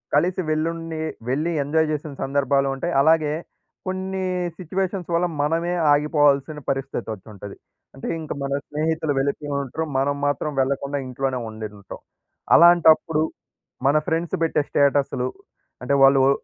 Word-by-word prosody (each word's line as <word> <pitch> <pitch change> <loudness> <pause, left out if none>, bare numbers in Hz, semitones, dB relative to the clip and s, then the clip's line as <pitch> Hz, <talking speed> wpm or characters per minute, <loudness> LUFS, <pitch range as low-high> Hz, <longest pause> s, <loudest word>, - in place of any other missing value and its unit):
కలిసి 180 +5 +2
వెళ్లుండి 165 +1 -2 0.3
వెళ్లి 155 +6 0
ఎంజాయ్ 160 +2 +1
చేసిన 150 -1 -4
సందర్భాలుంటాయి. 140 +3 0
అలాగే 155 0 +3 0.5
కొన్ని 190 0 -3 0.3
సిట్యుయేషన్స్ 185 +1 -3
వల్ల 175 +1 +2
మనమే 165 +4 0 0.2
ఆగిపోవాల్సిన 145 0 +2
పరిస్థితి 135 0 -3
వచ్చుంటది. 100 0 -10 0.4
అంటే 135 - -7
ఇంక 155 - -8
మన 140 - -3 0.2
స్నేహితులు 155 0 -1
వెలిపోయి 145 +2 -2
ఉంటారు. 145 +4 -4
మనం 140 +2 +1
మాత్రం 145 +1 -1
వెళ్ళకుండా 140 +1 0
ఇంట్లోనే 130 0 -2
ఉండి 110 0 -6
ఉంటాం. 100 - -10 0.6
అలాంటప్పుడు 165 -2 +6 0.7
మన 145 +2 +4
ఫ్రెండ్స్ 165 0 -1
పెట్టే 155 -2 +2
స్టేటస్లు 140 -3 +2 0.6
అంటే 135 +3 0
వాళ్ళు 135 0 +7
ఒ - - +5
150 Hz, 125 wpm, -23 LUFS, 135-165 Hz, 0.7 s, వాళ్ళు